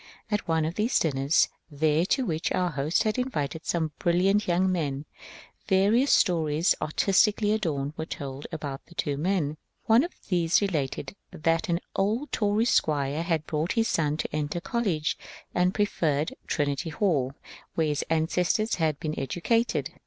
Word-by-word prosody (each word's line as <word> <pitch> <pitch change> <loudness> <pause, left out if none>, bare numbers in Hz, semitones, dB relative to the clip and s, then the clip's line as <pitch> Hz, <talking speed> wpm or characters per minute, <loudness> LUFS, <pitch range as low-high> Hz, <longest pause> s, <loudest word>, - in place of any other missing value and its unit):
At 210 - -1
one 160 -1 +1
of 160 - -2
the 215 +5 0
dinners 140 0 +2 0.2
there 155 +3 +1
to 265 +3 +1
which 160 -5 -1
our 180 -1 +1
hosts 145 +3 +1
had 215 +3 0
invited 160 - -3
some 160 -3 0
brilliant 190 +4 +2
young 185 +2 +2
men, 145 -5 -2 0.6
various 215 +8 +3
stories, 160 -3 +3
artistically 205 +6 +2
adorned, 155 -9 -1
were 160 0 -5
told 140 -1 -6
about 145 -4 -5
the 175 - -16
two 145 -3 -1
men. 155 -1 0 0.3
One 225 +4 +5
of 345 - -4 0.2
these 175 -2 +3
related 165 -5 -2
that 165 +2 0
an 170 +1 +1
old 220 +9 0
Tory 210 +1 +1
squire 150 - +1
had 165 -3 -1
brought 155 +4 -1
his 225 -1 +1
son 150 -2 +1
to 155 - -3
enter 150 +2 -2
college, 180 -7 -1 0.3
and 180 +1 +2
preferred 160 -8 0
Trinity 145 +2 -1
Hall, 145 -7 0 0.4
where 160 - +2
his 150 -1 0
ancestors 180 +7 +1
had 155 -3 +1
been 155 -1 -3
educated. 225 - 0
165 Hz, 155 wpm, -27 LUFS, 150-195 Hz, 0.6 s, One